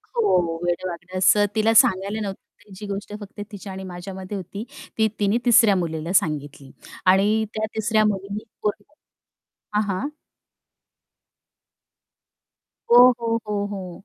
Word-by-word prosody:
हो, 180 - +2
वेडं-वाकडं 175 +1 -3
असं 205 +3 +5
तिला 220 +1 +3
सांगायला 200 0 +3
नव्हतं 195 -2 -4 0.2
पाहिजे, 205 -2 -17
जी 210 - -7
गोष्ट 200 +1 -7
फक्त 205 +1 -10
तिच्या 200 -1 -8
आणि 190 - -7
माझ्यामध्ये 190 +2 -7
होती. 195 +3 -7 0.3
ती 220 -1 +3
तिने 205 +3 +2
तिसऱ्या 225 -4 +6
मुलीला 165 -1 -3
सांगितली. 145 -5 -1 0.3
आणि 205 +4 +4
त्या 215 0 -1
तिसऱ्या 220 0 +2
मुलीने 200 0 -2 0.2
पूर्ण 210 0 -2 0.9
हां, 210 - +3
हां. 205 +6 -2 2.9
ओ, - - +9 0.2
हो, 230 - -4 0.2
हो, 205 -1 -1
हो. 185 -3 -7
200 Hz, 130 wpm, -23 LUFS, 185-210 Hz, 2.9 s, ओ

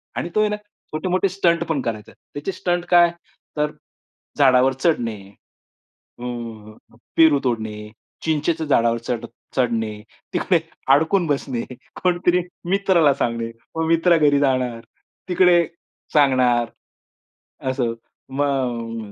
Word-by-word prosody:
आणि 170 - -3
तो - - +3
आहे 215 - +2
ना 210 - -1
छोटे-मोठे 185 -3 -3
स्टंट 170 -3 +1
पण 150 -4 0
करायचा. 110 -3 -5 0.2
त्याचे 145 +6 -3
स्टंट 175 -1 -1
काय? 175 -1 +6 0.5
तर 150 0 +1 0.7
झाडावर 130 -1 +5
चढणे, 130 -6 0 1.0
अ, - - -8 0.9
पेरू 160 -3 +6
तोडणे, 110 -4 -2 0.5
चिंचेच्या 160 +1 0
झाडावर 115 -4 +3
चढ 120 -1 -2 0.3
चढणे, 110 -4 0 0.3
तिकडे - - +2 0.4
अडकून 165 +5 +2
बसणे, 135 -4 -1 0.4
कुणीतरी 180 0 +2 0.3
मित्राला 185 -6 +4
सांगणे, 115 -3 -2 0.2
मग 160 0 0
मित्र 165 +1 +4
घरी 145 -2 +4
जाणार, 130 -4 0 0.5
तिकडे 180 -1 +5 0.5
सांगणार, 125 -5 +3 1.0
असं. 125 -3 -1 0.4
मग 120 -6 -2
145 Hz, 110 wpm, -22 LUFS, 120-170 Hz, 1.0 s, काय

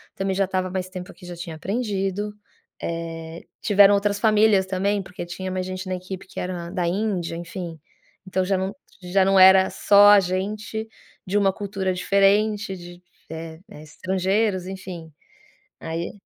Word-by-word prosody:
Também 195 0 -1
já 195 +1 +2
estava 185 0 -2
mais 185 0 -3
tempo 185 -1 -8
aqui, 180 - -15
já 175 0 -7
tinha 170 -1 -7
aprendido. 205 0 -2 0.5
Eh, 165 0 -5 0.2
tiveram 205 -1 +6
outras 200 0 0
famílias 215 -3 +4
também, 195 +2 0
porque 180 -1 -8
tinha 185 +2 -6
mais 185 0 -2
gente 185 +1 -5
na 185 - -1
equipe 185 +1 -8
que - - -8
era 175 -2 -4
da 180 -2 -1
Índia, 180 -2 -1
enfim. 170 -1 -7 0.5
Então 185 0 0
já 195 +1 +1
não 190 +1 -3 0.3
já 185 +2 +2
não 195 0 +4
era 190 0 +8
só 205 0 +6
a 205 - +8
gente 210 +4 -3 0.4
de 195 +3 +1
uma 195 -2 +3
cultura 195 -2 -2
diferente, 200 +2 +2
de, 175 0 -11 0.3
eh 160 0 -7
eh, 155 -7 -11
estrangeiros, 190 +4 -1
enfim. 185 -4 -8 0.7
Aí 165 +1 -4
190 Hz, 160 wpm, -23 LUFS, 180-200 Hz, 0.7 s, era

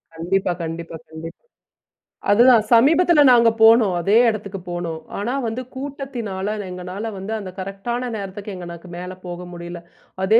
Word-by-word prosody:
கண்டிப்பா, 180 +3 0
கண்டிப்பா, 165 0 -5
கண்டிப்பா. 160 +1 -9 0.9
அதுதான் 235 +1 +6
சமீபத்தில 300 +6 +6
நாங்க 235 -2 +6
போனோம் 225 -4 +6
அதே 195 +5 +2
இடத்துக்கு 205 -3 -4
போனோம். 170 -2 -4 0.2
ஆனா 230 +5 -2
வந்து 225 +3 -3
கூட்டத்தினால 245 -8 -4
எங்களால 180 +4 -5
வந்து 195 +4 -5
அந்த 195 -3 -7
கரெக்ட்டான 220 +6 -4
நேரத்துக்கு 200 0 -6
எங்களால 175 0 -9
மேலே 180 +1 -6
போக 180 0 -6
முடியல. 175 0 -8 0.4
அதே 215 +4 +5
195 Hz, 135 wpm, -21 LUFS, 180-230 Hz, 0.9 s, அதுதான்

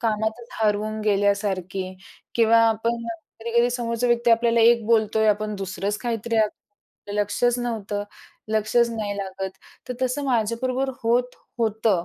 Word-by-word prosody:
कामातच 220 +1 -1
हरवून 215 +1 0
गेल्यासारखी 195 -2 0 0.4
किंवा 230 0 +5
आपण 230 +1 -1 0.4
कधी-कधी 235 +1 +2
समोरचा 240 -1 -1
व्यक्ती 240 0 +2
आपल्याला 230 0 +4
एक 235 0 +5
बोलतोय, 220 -1 +3
आपण 210 0 0
दुसरंच 195 +1 -3
काहीतरी 230 -1 -2 0.8
लक्षच 220 +4 +1
नव्हतं, 215 -4 -3 0.5
लक्षच 220 +2 +2
नाही 210 -3 -3
लागत. 190 -1 -4 0.4
तर 250 - -3
तसं 255 +3 0
माझ्याबरोबर 255 +2 0
होत 245 +2 +1 0.2
होतं. 220 -5 +1
225 Hz, 120 wpm, -24 LUFS, 210-235 Hz, 0.8 s, किंवा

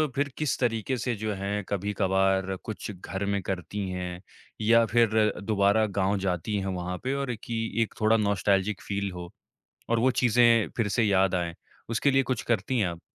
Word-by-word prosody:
फिर 140 +1 0
किस 150 -3 0
तरीके 120 +1 0
से 125 +1 -1
जो 110 0 -3
है 100 +1 -3
कभी-कभार 95 -1 +1
कुछ 110 0 -6
घर 95 +1 -5
में 100 -1 0
करती 95 +2 -4
हैं, 90 -1 -5 0.4
या 115 +1 +5
फिर 115 0 +3 0.3
दोबारा 100 +1 +3
गाँव 100 +1 +2
जाती 95 +2 -2
हैं 95 - -4
वहाँ 90 0 -4
पे 130 +1 -1
और 135 -4 -2
कि 115 -1 -3 0.2
एक 115 - -7
थोड़ा 110 +1 +4
नॉस्टैल्जिक 100 0 +1
फील 100 -1 -3
हो 90 -1 -8 0.6
और 115 - +3
वो 130 +3 +3
चीज़ें 120 -2 +4
फिर 115 -4 +1
से 120 - +1
याद 95 -2 +3
आएँ? 85 -2 -1 0.3
उसके 115 +5 +2
लिए 135 0 +3
कुछ 125 -2 -2
करती 120 +3 0
हैं 105 - +2
आप? 85 -1 -7
105 Hz, 185 wpm, -27 LUFS, 95-115 Hz, 0.6 s, या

